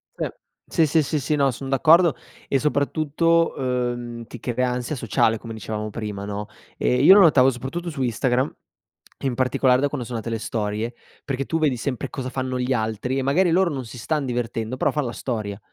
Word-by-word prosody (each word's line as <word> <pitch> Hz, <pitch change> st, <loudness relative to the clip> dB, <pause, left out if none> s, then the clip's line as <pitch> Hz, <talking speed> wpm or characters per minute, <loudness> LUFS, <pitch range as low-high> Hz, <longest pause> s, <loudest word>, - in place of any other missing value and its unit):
Sì, -, -, -3 dB, 0.3 s
sì, 165 Hz, -, +3 dB
sì, 155 Hz, +1 st, +3 dB
sì, 150 Hz, +2 st, -1 dB
sì, 140 Hz, +3 st, 0 dB
no, 140 Hz, -2 st, +3 dB
son 135 Hz, +3 st, -7 dB
d'accordo 160 Hz, +4 st, +5 dB, 0.3 s
e 135 Hz, -, +2 dB
soprattutto, 155 Hz, +3 st, +1 dB
uhm, 120 Hz, -2 st, -2 dB
ti 120 Hz, -, -9 dB
crea 125 Hz, +2 st, -1 dB
ansia 125 Hz, +4 st, -2 dB
sociale 115 Hz, -2 st, +1 dB
come 115 Hz, +1 st, -8 dB
dicevamo 110 Hz, 0 st, -4 dB
prima 105 Hz, -2 st, -5 dB
no? 105 Hz, 0 st, -4 dB, 0.3 s
Ehm, 125 Hz, +1 st, +1 dB
io 185 Hz, -, +10 dB
lo 205 Hz, -, +8 dB
notavo 135 Hz, -7 st, +6 dB
soprattutto 135 Hz, +8 st, -4 dB
su 145 Hz, -4 st, -5 dB
Instagram, 125 Hz, +3 st, 0 dB, 0.7 s
e -, -, -7 dB
in 125 Hz, -, -1 dB
particolare 130 Hz, 0 st, +2 dB
da 145 Hz, -, +3 dB
quando 135 Hz, -4 st, -4 dB
sono 120 Hz, -1 st, -4 dB
nate 115 Hz, -, -5 dB
le 115 Hz, -1 st, -2 dB
storie. 110 Hz, +2 st, -2 dB, 0.3 s
Perché 135 Hz, -1 st, -2 dB
tu 160 Hz, -, -1 dB
vedi 145 Hz, -5 st, +2 dB
sempre 125 Hz, +1 st, -3 dB
cosa 130 Hz, -2 st, -5 dB
fanno 130 Hz, -1 st, -3 dB
gli 125 Hz, +1 st, 0 dB
altri, 110 Hz, +2 st, -1 dB
e -, -, +1 dB
magari 165 Hz, +7 st, +3 dB
loro 185 Hz, +1 st, +3 dB
non 135 Hz, -3 st, -4 dB
si 115 Hz, -, -10 dB
stan 150 Hz, +4 st, -1 dB
divertendo 120 Hz, -1 st, -3 dB
però -, -, +2 dB
fan 150 Hz, -2 st, -1 dB
la 120 Hz, -, -3 dB
storia, 105 Hz, -6 st, -4 dB
130 Hz, 205 wpm, -23 LUFS, 115-145 Hz, 0.7 s, io